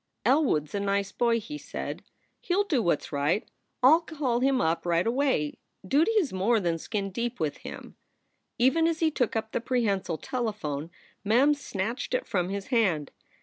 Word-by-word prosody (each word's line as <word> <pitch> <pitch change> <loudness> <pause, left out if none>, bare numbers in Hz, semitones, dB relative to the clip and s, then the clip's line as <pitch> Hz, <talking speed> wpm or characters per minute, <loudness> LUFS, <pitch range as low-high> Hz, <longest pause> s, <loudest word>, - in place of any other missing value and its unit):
"Elwood 265 - +3
s 150 - -18
a 200 - -1
nice 200 0 0
boy," 235 -1 +2
he 295 +7 -7
said. - - -6 0.4
"He 355 - -1
ll 405 - +3
do 310 -11 +1
what 170 -7 +1
s - - -10
right. 150 - 0 0.4
I - - +9
ll 325 - +5
call 290 -8 -1
him 265 0 +2
up 160 +1 +1
right 170 0 +1
away. 240 - 0 0.3
Duty 315 - +3
is 375 - +1
more 210 +5 +2
than 170 -4 -1
skin 200 +1 -3
deep 235 +4 -3
with 155 -3 -1
him." - - -9 0.6
Even 290 +7 +4
as 330 -1 -1
he 320 -1 +2
took 245 -6 0
up 220 0 -2
the - - -1
prehensile 210 -9 0
telephone, 205 - -3 0.3
Mem 245 +8 +4
snatched 235 - -3
it - - -1
from 180 -2 -1
his 200 0 -4
hand. 190 - +1
230 Hz, 190 wpm, -27 LUFS, 185-270 Hz, 0.6 s, I